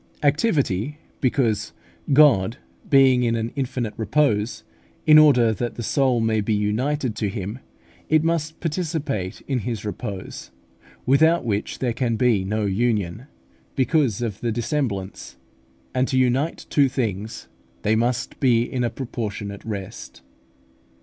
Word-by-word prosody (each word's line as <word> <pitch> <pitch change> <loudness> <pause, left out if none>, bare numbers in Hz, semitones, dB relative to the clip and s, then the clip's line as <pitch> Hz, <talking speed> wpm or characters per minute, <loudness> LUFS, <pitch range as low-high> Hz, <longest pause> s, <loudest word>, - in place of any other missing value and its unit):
Activity, 145 - +1 0.2
because 125 -5 0 0.4
God 130 -7 +5 0.3
being 135 -4 +5
in 115 -1 +1
an 115 0 -2
infinite 125 -5 -2
repose, 110 -1 0 0.4
in 155 0 +8
order 125 -7 +5
that 120 +2 -4
the 120 - -5
soul 130 0 +2
may 110 -1 +1
be 105 +1 0
united 120 +5 -1
to 105 - -1
Him, 105 +3 -5 0.5
it 155 0 +4
must 160 -1 -1
participate 155 - -3
in 135 -3 -2
His 110 -1 -4
repose, 100 - -6 0.6
without 160 +4 +4
which 105 -2 -2
there 125 -3 -1
can 115 -1 -1
be 115 -5 +2
no 105 +2 -1
union, 105 +1 -1 0.5
because 130 -5 +1
of 105 -5 -4
the 120 - -1
dissemblance; 115 -5 -3 0.6
and 130 +1 +1
to 130 - 0
unite 130 +5 +1
two 140 -2 +4
things, 110 -5 -3 0.4
they 110 - +2
must 120 +2 -1
be 120 -4 +3
in 125 0 -3
a 120 - +1
proportionate 105 -6 -5
rest. 100 -4 -7
120 Hz, 135 wpm, -23 LUFS, 105-140 Hz, 0.6 s, in